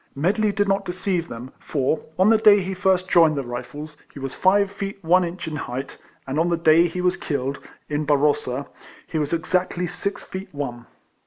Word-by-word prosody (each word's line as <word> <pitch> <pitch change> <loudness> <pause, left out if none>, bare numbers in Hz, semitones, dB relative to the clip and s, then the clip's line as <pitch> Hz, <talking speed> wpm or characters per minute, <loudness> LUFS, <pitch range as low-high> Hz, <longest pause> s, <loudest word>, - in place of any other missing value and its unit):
Medley 200 +9 +1
did 205 0 0
not 195 0 +1
deceive 180 -2 -2
them; 120 0 -8
for, 140 +1 -1
on 190 +3 +5
the 225 - +5
day 210 -2 +7
he 190 0 -3
first 185 0 +1
joined 165 -4 +5
the 140 - -1
Kifles, 145 +5 -7
he - - -14
was 135 -1 -4
five 200 +1 +3
feet 200 0 -5
one 180 +3 +4
inch 175 0 -5
in 155 - -4
height, 135 -2 -5 0.3
and 135 +3 -2
on 170 +2 +2
the 170 - +1
day 165 +1 +5
he 180 +2 -4
was 180 0 +2
killed, 140 -1 -3 0.3
at 150 0 -2
Barrossa, 140 -2 +1 0.4
he 160 - -3
was 150 -1 -1
exactly 180 +2 0
six 180 +3 -3
feet 190 +1 -7
one. 120 -5 -5
170 Hz, 195 wpm, -23 LUFS, 145-185 Hz, 0.4 s, day